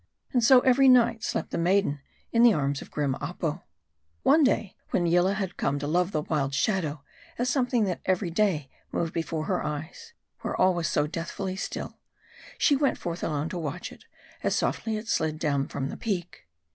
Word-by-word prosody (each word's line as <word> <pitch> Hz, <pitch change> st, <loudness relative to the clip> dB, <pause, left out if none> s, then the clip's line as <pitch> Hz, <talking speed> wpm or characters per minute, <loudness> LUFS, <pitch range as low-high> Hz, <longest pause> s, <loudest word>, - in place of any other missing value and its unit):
And 245 Hz, -2 st, +3 dB
so, 250 Hz, +2 st, +7 dB
every 265 Hz, +1 st, +5 dB
night, 235 Hz, -3 st, +4 dB
slept -, -, -2 dB
the -, -, -2 dB
maiden 175 Hz, -5 st, +2 dB, 0.3 s
in 230 Hz, -, +3 dB
the 235 Hz, -2 st, +7 dB
arms 140 Hz, -3 st, -1 dB
of -, -, -10 dB
grim 145 Hz, -3 st, -1 dB
Apo. 165 Hz, +1 st, -3 dB, 0.6 s
One 315 Hz, -, +5 dB
day 220 Hz, -7 st, +1 dB
when 175 Hz, -, +1 dB
Yillah 175 Hz, +3 st, +3 dB
had 195 Hz, -3 st, -4 dB
come 140 Hz, +1 st, 0 dB
to 145 Hz, -, -4 dB
love 175 Hz, +5 st, +1 dB
the 155 Hz, -4 st, -1 dB
wild 140 Hz, -3 st, -1 dB
shadow, 155 Hz, -5 st, 0 dB, 0.3 s
as 250 Hz, -2 st, 0 dB
something 245 Hz, -3 st, +1 dB
that 185 Hz, -4 st, -2 dB
every 185 Hz, -1 st, 0 dB
day 175 Hz, -7 st, +1 dB, 0.2 s
moved 165 Hz, -1 st, -2 dB
before 160 Hz, -1 st, -2 dB
her -, -, -1 dB
eyes, 155 Hz, -, -6 dB, 0.3 s
where -, -, -3 dB
all 185 Hz, 0 st, +5 dB
was 170 Hz, -3 st, -1 dB
so 145 Hz, -, +1 dB
deathfully 170 Hz, +4 st, -4 dB
still; 190 Hz, -, -5 dB, 0.6 s
she 290 Hz, -, +4 dB
went 280 Hz, 0 st, +1 dB
forth 170 Hz, 0 st, -5 dB
alone 150 Hz, 0 st, -1 dB
to 180 Hz, -, -4 dB
watch 150 Hz, -3 st, -5 dB
it, -, -, -15 dB, 0.4 s
as -, -, +1 dB
softly 220 Hz, -2 st, -1 dB
it 215 Hz, +2 st, -7 dB
slid 160 Hz, -7 st, 0 dB
down 140 Hz, -3 st, 0 dB
from 135 Hz, 0 st, -4 dB
the -, -, -6 dB
peak. 180 Hz, -, -4 dB
175 Hz, 195 wpm, -27 LUFS, 150-220 Hz, 0.6 s, so